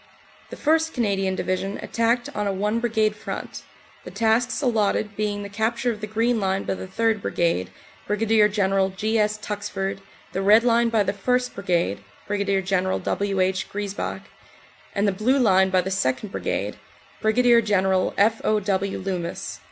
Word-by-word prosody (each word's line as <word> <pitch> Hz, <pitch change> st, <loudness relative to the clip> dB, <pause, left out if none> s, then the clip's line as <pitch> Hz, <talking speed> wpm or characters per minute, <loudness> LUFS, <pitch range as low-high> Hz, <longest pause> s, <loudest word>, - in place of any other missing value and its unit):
The -, -, -7 dB
1st. 320 Hz, +1 st, +2 dB
Canadian 195 Hz, -5 st, 0 dB
Division 190 Hz, +2 st, -2 dB
attacked 235 Hz, +1 st, 0 dB
on 210 Hz, -1 st, -1 dB
a -, -, +1 dB
one 210 Hz, +4 st, 0 dB
Brigade 220 Hz, -3 st, +1 dB
front, -, -, -6 dB, 0.4 s
the -, -, -8 dB
tasks 225 Hz, +5 st, +1 dB
allotted 215 Hz, -5 st, 0 dB
being 205 Hz, -1 st, -2 dB
the -, -, -5 dB
capture 225 Hz, +4 st, -1 dB
of 210 Hz, -2 st, -7 dB
the 215 Hz, -, -4 dB
Green 225 Hz, +2 st, +1 dB
Line 195 Hz, -1 st, 0 dB
by -, -, -2 dB
the 190 Hz, -, -7 dB
3rd. 220 Hz, +2 st, 0 dB
Brigade, 165 Hz, -, 0 dB, 0.4 s
Brig. 210 Hz, 0 st, +3 dB
General 195 Hz, -1 st, +2 dB
G. 215 Hz, +4 st, -1 dB
S. 210 Hz, 0 st, +1 dB
Tuxford, 200 Hz, -2 st, -4 dB, 0.3 s
the 190 Hz, -, -1 dB
Red 210 Hz, +4 st, +6 dB
Line 235 Hz, -1 st, +3 dB
by 225 Hz, -2 st, +2 dB
the 195 Hz, 0 st, -1 dB
1st. 250 Hz, +5 st, 0 dB
Brigade, 175 Hz, -, 0 dB, 0.3 s
Brig. 200 Hz, -2 st, 0 dB
General 185 Hz, 0 st, +1 dB
W. 200 Hz, -1 st, -1 dB
H. 185 Hz, 0 st, 0 dB
Griesbach, 205 Hz, -1 st, -4 dB, 0.7 s
and 200 Hz, +1 st, +2 dB
the -, -, +3 dB
blue 220 Hz, +8 st, +1 dB
line 190 Hz, -6 st, +4 dB
by 185 Hz, -1 st, +3 dB
the 190 Hz, +2 st, -4 dB
2nd. 190 Hz, +2 st, -1 dB
Brigade, -, -, -3 dB, 0.4 s
Brig. 235 Hz, +2 st, +4 dB
General 190 Hz, -3 st, +1 dB
F. 220 Hz, +3 st, +3 dB
O. 215 Hz, 0 st, +2 dB
W. 195 Hz, -1 st, -1 dB
Loomis. 180 Hz, -3 st, -4 dB
205 Hz, 165 wpm, -24 LUFS, 190-225 Hz, 0.7 s, Red